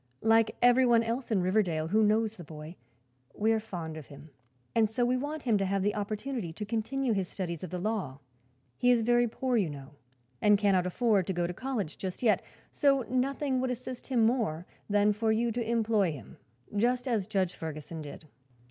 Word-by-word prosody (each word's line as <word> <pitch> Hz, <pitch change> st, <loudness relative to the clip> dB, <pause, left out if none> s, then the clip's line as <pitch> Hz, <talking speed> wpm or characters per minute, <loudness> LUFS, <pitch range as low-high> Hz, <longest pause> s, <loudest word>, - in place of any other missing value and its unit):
"Like 225 Hz, 0 st, +4 dB
everyone 245 Hz, -1 st, +5 dB
else 235 Hz, +3 st, -3 dB
in 200 Hz, -5 st, +1 dB
Riverdale 180 Hz, -5 st, +1 dB
who 215 Hz, +4 st, +3 dB
knows 215 Hz, +1 st, +2 dB
the 175 Hz, -, -10 dB
boy, 155 Hz, +2 st, -9 dB, 0.6 s
we 220 Hz, +2 st, +2 dB
are 225 Hz, -, +2 dB
fond 170 Hz, -7 st, -6 dB
of 155 Hz, -, -9 dB
him, 145 Hz, +2 st, -13 dB, 0.4 s
and 220 Hz, -2 st, +3 dB
so 240 Hz, +3 st, 0 dB
we 250 Hz, +1 st, +2 dB
want 290 Hz, +4 st, -3 dB
him 225 Hz, -5 st, +2 dB
to 195 Hz, -, +1 dB
have 195 Hz, 0 st, 0 dB
the 205 Hz, +1 st, +1 dB
opportunity 210 Hz, -1 st, -3 dB
to 210 Hz, -, -5 dB
continue 235 Hz, +4 st, -1 dB
his 195 Hz, -3 st, -1 dB
studies 170 Hz, -4 st, -5 dB
of 185 Hz, -, -5 dB
the 180 Hz, -, -4 dB
law. 190 Hz, -8 st, -2 dB, 0.6 s
He 245 Hz, -, +3 dB
is 240 Hz, -2 st, +4 dB
very 240 Hz, +1 st, +3 dB
poor, 250 Hz, +2 st, -1 dB
you 195 Hz, -7 st, +1 dB
know, 140 Hz, -2 st, -9 dB, 0.5 s
and 210 Hz, -1 st, +5 dB
cannot 195 Hz, -3 st, +2 dB
afford 205 Hz, -1 st, +2 dB
to 190 Hz, -, 0 dB
go 175 Hz, -1 st, 0 dB
to 175 Hz, -, -3 dB
college 220 Hz, -, -4 dB
just 190 Hz, +4 st, -5 dB
yet; 220 Hz, -3 st, +4 dB, 0.3 s
so 275 Hz, -2 st, +3 dB
nothing 260 Hz, +1 st, 0 dB
would 260 Hz, -, 0 dB
assist 250 Hz, 0 st, -6 dB
him 240 Hz, -4 st, +3 dB
more 215 Hz, -9 st, 0 dB, 0.2 s
than 205 Hz, 0 st, +3 dB
for 220 Hz, +1 st, 0 dB
you 230 Hz, +2 st, +1 dB
to 230 Hz, 0 st, -3 dB
employ 220 Hz, -6 st, +2 dB
him, 130 Hz, -8 st, -11 dB, 0.4 s
just 245 Hz, +4 st, +1 dB
as 220 Hz, -6 st, 0 dB
Judge 190 Hz, -4 st, 0 dB
Ferguson 160 Hz, 0 st, -6 dB
did." 150 Hz, +1 st, -10 dB
215 Hz, 200 wpm, -30 LUFS, 180-240 Hz, 0.6 s, everyone